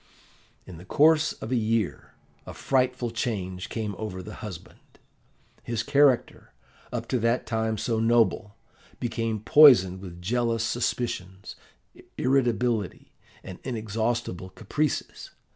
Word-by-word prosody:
"In 90 Hz, -3 st, -10 dB
the 85 Hz, -, -11 dB
course 155 Hz, +9 st, +3 dB
of 110 Hz, -, -8 dB
a -, -, +2 dB
year 110 Hz, -, -1 dB, 0.3 s
a -, -, -8 dB
frightful 125 Hz, -2 st, 0 dB
change 95 Hz, -6 st, -3 dB
came 110 Hz, -3 st, -3 dB
over 95 Hz, -4 st, -5 dB
the 105 Hz, +3 st, -9 dB
husband. 95 Hz, -6 st, -9 dB, 0.8 s
His 115 Hz, -1 st, -3 dB
character, 140 Hz, -1 st, +2 dB, 0.4 s
up -, -, -4 dB
to 125 Hz, -, +1 dB
that 115 Hz, +2 st, +1 dB
time 110 Hz, -1 st, -1 dB
so 115 Hz, +2 st, -1 dB
noble, 115 Hz, -2 st, +2 dB, 0.4 s
became 115 Hz, -2 st, -2 dB
poisoned 110 Hz, -9 st, +6 dB
with 90 Hz, -3 st, -9 dB
jealous 115 Hz, +4 st, 0 dB
suspicions, 115 Hz, -5 st, -3 dB, 0.6 s
irritability, 120 Hz, -5 st, 0 dB, 0.3 s
and 95 Hz, -, -9 dB
inexhaustible 110 Hz, -5 st, -3 dB
caprices. 150 Hz, +9 st, -3 dB
115 Hz, 115 wpm, -26 LUFS, 100-120 Hz, 0.8 s, poisoned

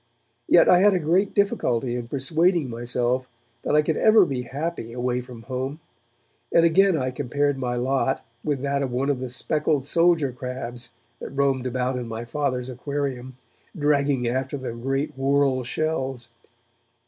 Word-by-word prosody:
Yet 175 Hz, -, +6 dB
I 180 Hz, -, +6 dB
had 200 Hz, +1 st, +5 dB
a -, -, +2 dB
great 180 Hz, +5 st, +1 dB
difficulty 125 Hz, -, +1 dB
in 120 Hz, -1 st, -4 dB
persuading 155 Hz, +3 st, +1 dB
myself 120 Hz, +2 st, -1 dB, 0.3 s
that -, -, 0 dB
I 150 Hz, -, +5 dB
could 155 Hz, 0 st, -1 dB
ever 215 Hz, -3 st, +6 dB
be 135 Hz, -5 st, -2 dB
happy 135 Hz, -1 st, -5 dB
away 125 Hz, 0 st, -1 dB
from 120 Hz, -2 st, -11 dB
home, 130 Hz, +5 st, -4 dB, 0.7 s
and 170 Hz, -, +5 dB
again 185 Hz, +1 st, +4 dB
I 130 Hz, -2 st, -1 dB
compared 145 Hz, +2 st, 0 dB
my 125 Hz, -2 st, -2 dB
lot 130 Hz, +2 st, 0 dB, 0.2 s
with 145 Hz, -3 st, -2 dB
that 140 Hz, 0 st, 0 dB
of 135 Hz, -2 st, -2 dB
one 135 Hz, +3 st, 0 dB
of 135 Hz, -, -2 dB
the 130 Hz, -1 st, -4 dB
speckled 150 Hz, +2 st, 0 dB
soldier 165 Hz, -3 st, +3 dB
crabs 125 Hz, -1 st, -6 dB, 0.3 s
that -, -, -7 dB
roamed 135 Hz, -2 st, 0 dB
about 125 Hz, 0 st, -1 dB
in 125 Hz, -2 st, -4 dB
my 115 Hz, +1 st, -5 dB
Father's 125 Hz, -1 st, -2 dB
aquarium, 130 Hz, -1 st, -4 dB, 0.4 s
dragging 140 Hz, -4 st, +1 dB
after 130 Hz, +3 st, -2 dB
them 120 Hz, -3 st, -6 dB
great 135 Hz, +3 st, -2 dB
whorl 135 Hz, -1 st, +1 dB
shells. 135 Hz, -3 st, -2 dB
135 Hz, 160 wpm, -24 LUFS, 125-150 Hz, 0.7 s, Yet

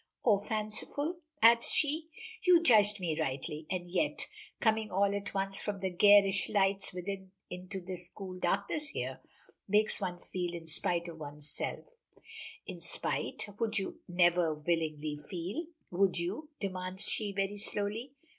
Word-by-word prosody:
"Or 210 Hz, -5 st, +5 dB
fanciful?" 220 Hz, -, -2 dB, 0.3 s
adds 230 Hz, +1 st, +7 dB
she. 310 Hz, +2 st, 0 dB, 0.3 s
"You 350 Hz, -2 st, +6 dB
judged 210 Hz, -6 st, +6 dB
me 165 Hz, -4 st, -1 dB
rightly, 150 Hz, +4 st, -3 dB
and 180 Hz, -1 st, -2 dB
yet 245 Hz, -, 0 dB, 0.3 s
coming 220 Hz, -1 st, +2 dB
all 200 Hz, +1 st, +2 dB
at 200 Hz, 0 st, -4 dB
once 195 Hz, 0 st, -1 dB
from 205 Hz, -2 st, -2 dB
the 190 Hz, -1 st, -1 dB
garish 200 Hz, +1 st, +6 dB
lights 195 Hz, -1 st, +2 dB
within 190 Hz, +1 st, -5 dB, 0.2 s
into 180 Hz, +1 st, -5 dB
this 180 Hz, -1 st, -5 dB
cool 195 Hz, -2 st, -8 dB
sweet 185 Hz, 0 st, -9 dB
darkness 200 Hz, +12 st, 0 dB
here, 130 Hz, -, -4 dB, 0.5 s
makes 210 Hz, +2 st, +3 dB
one 180 Hz, -2 st, -2 dB
feel 175 Hz, -1 st, -3 dB
in 165 Hz, -1 st, -7 dB
spite 170 Hz, +2 st, +1 dB
of 165 Hz, -2 st, -8 dB
oneself." 150 Hz, 0 st, -4 dB, 0.8 s
"In -, -, -7 dB
spite! -, -, -2 dB
Would 220 Hz, -2 st, 0 dB
you 195 Hz, -, -3 dB
never 175 Hz, -2 st, +3 dB
willingly 155 Hz, -1 st, -1 dB
feel?" 180 Hz, -, -5 dB, 0.2 s
"Would 185 Hz, +1 st, +2 dB
you?" 190 Hz, -, -3 dB
demands 185 Hz, 0 st, -3 dB
she 210 Hz, -2 st, -1 dB
very 200 Hz, +1 st, -1 dB
slowly. 210 Hz, +6 st, -1 dB
195 Hz, 145 wpm, -32 LUFS, 175-210 Hz, 0.8 s, adds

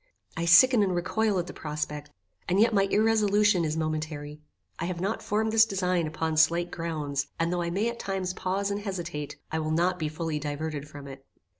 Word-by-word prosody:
I 165 Hz, -, -2 dB
sicken 215 Hz, +8 st, +7 dB
and 190 Hz, -3 st, +1 dB
recoil 205 Hz, +4 st, 0 dB
at 175 Hz, -, -1 dB
the -, -, -9 dB
prospect, 150 Hz, -1 st, -5 dB, 0.4 s
and 185 Hz, +3 st, +2 dB
yet 225 Hz, +1 st, +4 dB
my 195 Hz, -1 st, +4 dB
irresolution 210 Hz, -3 st, +3 dB
is 155 Hz, 0 st, -1 dB
momentary. 155 Hz, -1 st, -4 dB, 0.4 s
I 170 Hz, -, -2 dB
have 175 Hz, -1 st, -3 dB
not 195 Hz, +5 st, -2 dB
formed 220 Hz, +1 st, 0 dB
this 225 Hz, 0 st, +6 dB
design 185 Hz, -5 st, 0 dB
upon 160 Hz, 0 st, -2 dB
slight 170 Hz, +2 st, +3 dB
grounds, 150 Hz, -4 st, -3 dB
and 165 Hz, +1 st, +1 dB
though 175 Hz, -, -1 dB
I 170 Hz, -, -2 dB
may 200 Hz, +6 st, 0 dB
at 235 Hz, 0 st, -4 dB
times 190 Hz, -2 st, -2 dB
pause 195 Hz, +2 st, -2 dB
and 200 Hz, +1 st, -2 dB
hesitate, 175 Hz, -8 st, -5 dB, 0.2 s
I 160 Hz, -, -1 dB
will 155 Hz, 0 st, -2 dB
not 175 Hz, +3 st, +1 dB
be 155 Hz, -2 st, -1 dB
finally 155 Hz, -1 st, -3 dB
diverted 150 Hz, 0 st, -4 dB
from 145 Hz, -2 st, -10 dB
it. 135 Hz, 0 st, -10 dB
170 Hz, 200 wpm, -27 LUFS, 155-195 Hz, 0.4 s, sicken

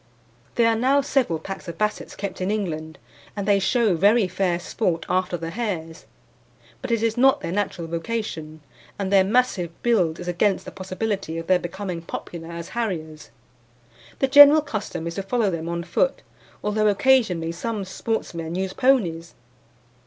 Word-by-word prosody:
There 235 Hz, -1 st, +4 dB
are 230 Hz, -, +3 dB
now 265 Hz, +5 st, +3 dB
several 265 Hz, -, +1 dB
packs 195 Hz, +3 st, -8 dB
of 170 Hz, -1 st, -6 dB
Bassets 215 Hz, 0 st, -2 dB
kept 195 Hz, -2 st, -5 dB
in 185 Hz, -, -1 dB
England, 160 Hz, -7 st, -3 dB, 0.4 s
and 200 Hz, -1 st, -4 dB
they 200 Hz, -1 st, +4 dB
show 220 Hz, +1 st, +2 dB
very 200 Hz, +5 st, +4 dB
fair 180 Hz, -1 st, 0 dB
sport 175 Hz, -2 st, -2 dB
after 185 Hz, -1 st, 0 dB
the 165 Hz, 0 st, -5 dB
hares; 175 Hz, -6 st, -4 dB, 0.7 s
but 260 Hz, -, -5 dB
it 230 Hz, -1 st, +1 dB
is 225 Hz, 0 st, 0 dB
not 265 Hz, +2 st, +4 dB
their -, -, -4 dB
natural 185 Hz, -3 st, -2 dB
vocation, 165 Hz, -3 st, -4 dB, 0.4 s
and 200 Hz, -1 st, -2 dB
their 195 Hz, -1 st, +6 dB
massive 205 Hz, -4 st, +1 dB
build 185 Hz, -9 st, +2 dB
is 175 Hz, -, -7 dB
against 185 Hz, +3 st, +1 dB
the -, -, -7 dB
possibility 190 Hz, -2 st, -3 dB
of 165 Hz, -, -5 dB
their 185 Hz, 0 st, +3 dB
becoming 180 Hz, 0 st, -5 dB
popular 165 Hz, 0 st, -7 dB
as 170 Hz, 0 st, -7 dB
harriers. 160 Hz, -10 st, -4 dB, 0.9 s
The 270 Hz, -, +1 dB
general 290 Hz, +3 st, +9 dB
custom 210 Hz, -, -4 dB
is 170 Hz, -, -3 dB
to 195 Hz, -, -3 dB
follow 205 Hz, +1 st, 0 dB
them 165 Hz, -1 st, -4 dB
on 170 Hz, 0 st, -3 dB
foot, -, -, 0 dB, 0.4 s
although 215 Hz, +1 st, +1 dB
occasionally 205 Hz, -7 st, +3 dB
some 205 Hz, +4 st, -4 dB
sportsmen 175 Hz, -5 st, -3 dB
use 190 Hz, 0 st, -2 dB
ponies. 180 Hz, -11 st, +1 dB
190 Hz, 165 wpm, -23 LUFS, 170-225 Hz, 0.9 s, general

